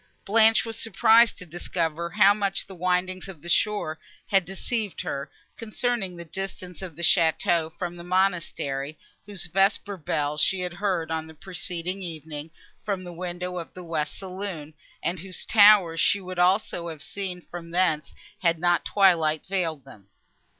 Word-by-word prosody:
Blanche 220 Hz, +2 st, +5 dB
was 225 Hz, -1 st, -5 dB
surprised 225 Hz, +1 st, +5 dB
to 180 Hz, -, -9 dB
discover 170 Hz, -1 st, -2 dB
how 200 Hz, +3 st, +6 dB
much 200 Hz, -2 st, -1 dB
the 195 Hz, -, -11 dB
windings 185 Hz, +1 st, -1 dB
of 175 Hz, -7 st, -10 dB
the -, -, -9 dB
shore 175 Hz, -4 st, +1 dB, 0.3 s
had 195 Hz, -4 st, +2 dB
deceived 205 Hz, +3 st, -3 dB
her, 140 Hz, 0 st, -4 dB, 0.3 s
concerning 225 Hz, -4 st, -2 dB
the 170 Hz, -, -8 dB
distance 185 Hz, 0 st, -6 dB
of 180 Hz, -5 st, -7 dB
the 170 Hz, -, -7 dB
château 165 Hz, 0 st, +3 dB
from 175 Hz, -1 st, -4 dB
the 170 Hz, -, -9 dB
monastery, 170 Hz, -6 st, 0 dB, 0.3 s
whose 195 Hz, -4 st, -1 dB
vesper 195 Hz, +3 st, +1 dB
bell 150 Hz, -2 st, -1 dB
she 185 Hz, +4 st, +2 dB
had 180 Hz, -1 st, -3 dB
heard, 175 Hz, -4 st, -1 dB
on 160 Hz, 0 st, -2 dB
the 160 Hz, -, -13 dB
preceding 180 Hz, +1 st, -5 dB
evening, 160 Hz, -3 st, -7 dB, 0.3 s
from 195 Hz, -3 st, -2 dB
the 175 Hz, -1 st, -8 dB
windows 180 Hz, 0 st, -4 dB
of 165 Hz, -, -11 dB
the 180 Hz, -, -8 dB
west 155 Hz, -3 st, -2 dB
saloon, 185 Hz, -5 st, -6 dB, 0.3 s
and 175 Hz, +1 st, -1 dB
whose 185 Hz, +1 st, -7 dB
towers 205 Hz, -6 st, +6 dB
she 200 Hz, -, +3 dB
would 185 Hz, -1 st, -6 dB
also 180 Hz, -1 st, +2 dB
have 160 Hz, -3 st, -7 dB
seen 190 Hz, -3 st, -4 dB
from 170 Hz, -1 st, -9 dB
thence, 165 Hz, -4 st, +1 dB, 0.3 s
had 170 Hz, -2 st, +2 dB
not 175 Hz, +1 st, +2 dB
twilight 165 Hz, -6 st, +3 dB
veiled 165 Hz, -7 st, -2 dB
them. 105 Hz, -8 st, -15 dB
180 Hz, 165 wpm, -26 LUFS, 165-195 Hz, 0.3 s, how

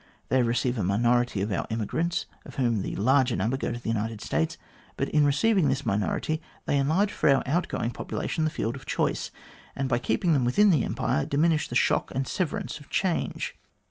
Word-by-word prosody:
They 130 Hz, -, +3 dB
receive 120 Hz, +1 st, 0 dB
a -, -, 0 dB
minority 120 Hz, +2 st, +2 dB
of 105 Hz, -, -3 dB
our 95 Hz, -, -1 dB
emigrants, 140 Hz, -, -1 dB, 0.2 s
of -, -, -12 dB
whom 120 Hz, -6 st, +1 dB
the -, -, -4 dB
larger 130 Hz, +3 st, +3 dB
number 110 Hz, +7 st, 0 dB
go 135 Hz, -, -2 dB
to -, -, -3 dB
the 120 Hz, -, -5 dB
United 110 Hz, 0 st, -2 dB
States; 160 Hz, +8 st, -1 dB, 0.4 s
but, 135 Hz, -, -1 dB
in 150 Hz, -1 st, +4 dB
receiving 190 Hz, +4 st, +3 dB
this 135 Hz, +1 st, -1 dB
minority, 110 Hz, -, -1 dB, 0.2 s
they 145 Hz, -, +1 dB
enlarge 165 Hz, +9 st, +2 dB
for 155 Hz, -, +1 dB
our 135 Hz, -1 st, +4 dB
outgoing 140 Hz, -5 st, -1 dB
population 160 Hz, -, -3 dB
the 155 Hz, -, +2 dB
field 120 Hz, -5 st, -2 dB
of 135 Hz, -, -11 dB
choice, -, -, -1 dB, 0.5 s
and 135 Hz, -, -1 dB
by 120 Hz, -2 st, +1 dB
keeping 125 Hz, +9 st, +1 dB
them 135 Hz, -4 st, +2 dB
within 200 Hz, +12 st, +4 dB
the 150 Hz, -8 st, +3 dB
Empire, 75 Hz, -, -1 dB
diminish 155 Hz, +2 st, +2 dB
the 120 Hz, -, -6 dB
shock -, -, +2 dB
and 135 Hz, 0 st, -1 dB
severance 175 Hz, -4 st, -2 dB
of 145 Hz, -, -16 dB
change. 185 Hz, -3 st, -1 dB
130 Hz, 200 wpm, -27 LUFS, 115-155 Hz, 0.5 s, in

